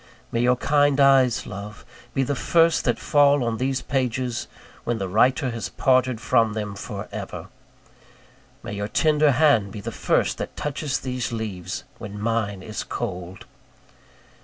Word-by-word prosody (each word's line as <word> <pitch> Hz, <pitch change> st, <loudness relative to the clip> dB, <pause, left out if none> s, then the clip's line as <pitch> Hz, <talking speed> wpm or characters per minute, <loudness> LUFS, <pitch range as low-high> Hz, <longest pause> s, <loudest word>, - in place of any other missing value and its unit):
May 115 Hz, -, 0 dB
your 125 Hz, +1 st, +4 dB
kind 145 Hz, +1 st, +2 dB
eyes, 135 Hz, -3 st, +4 dB
love, 105 Hz, +1 st, -8 dB, 0.3 s
be 135 Hz, -, +2 dB
the 145 Hz, -, -1 dB
first 165 Hz, +4 st, +3 dB
that -, -, +2 dB
fall 145 Hz, -2 st, +4 dB
on 115 Hz, -1 st, -1 dB
these 130 Hz, +1 st, -1 dB
pages, 125 Hz, -2 st, -1 dB, 0.4 s
when 120 Hz, -1 st, -1 dB
the 95 Hz, -3 st, -3 dB
writer 125 Hz, +7 st, +2 dB
has 115 Hz, -2 st, -4 dB
parted 130 Hz, -2 st, +2 dB
from 115 Hz, -2 st, +2 dB
them 105 Hz, -2 st, -4 dB
for 100 Hz, -, -6 dB
ever! -, -, -7 dB, 1.1 s
May -, -, -6 dB
your 100 Hz, 0 st, -3 dB
tender 150 Hz, +4 st, +3 dB
hand 125 Hz, -8 st, +3 dB
be 105 Hz, -, -7 dB
the 100 Hz, -, -5 dB
first -, -, 0 dB
that -, -, -6 dB
touches 145 Hz, -1 st, -2 dB
these 125 Hz, -3 st, -3 dB
leaves, 105 Hz, -6 st, -4 dB, 0.2 s
when 105 Hz, 0 st, -7 dB
mine 105 Hz, -3 st, -1 dB
is 110 Hz, -, -5 dB
cold! 90 Hz, -5 st, -5 dB
120 Hz, 155 wpm, -24 LUFS, 105-135 Hz, 1.1 s, your